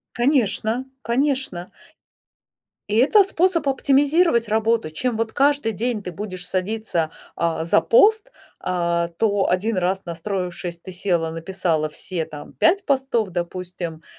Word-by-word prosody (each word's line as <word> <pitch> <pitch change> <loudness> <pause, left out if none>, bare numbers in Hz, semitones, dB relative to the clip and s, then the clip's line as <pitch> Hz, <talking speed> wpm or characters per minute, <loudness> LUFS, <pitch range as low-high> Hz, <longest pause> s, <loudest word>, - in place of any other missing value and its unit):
Конечно, 240 -2 +1 0.2
конечно. 255 -8 -1 1.2
И 210 - -2
это 390 - +6
способ 360 -4 +1
оптимизировать 275 0 +3
работу. 220 -3 +1
Чем 240 +9 -1
вот 225 0 -2
каждый 285 -4 +2
день 220 0 -2
ты 180 - -5
будешь 185 0 -6
садиться, 185 -4 -1 0.2
а, 165 -1 -1
за 165 - +4
пост, 435 - +4 0.3
а, 170 -1 0
то 205 -3 +2
один 205 +4 0
раз, 185 +1 0
настроившись, 175 0 -4
ты 185 +2 -10
села, 175 -3 0
написала 165 -2 -1
все 165 +2 -4
там 150 -1 -10
5 385 +4 +2
постов, 265 -7 +1
допустим, 175 -2 -5
205 Hz, 125 wpm, -22 LUFS, 175-255 Hz, 1.2 s, это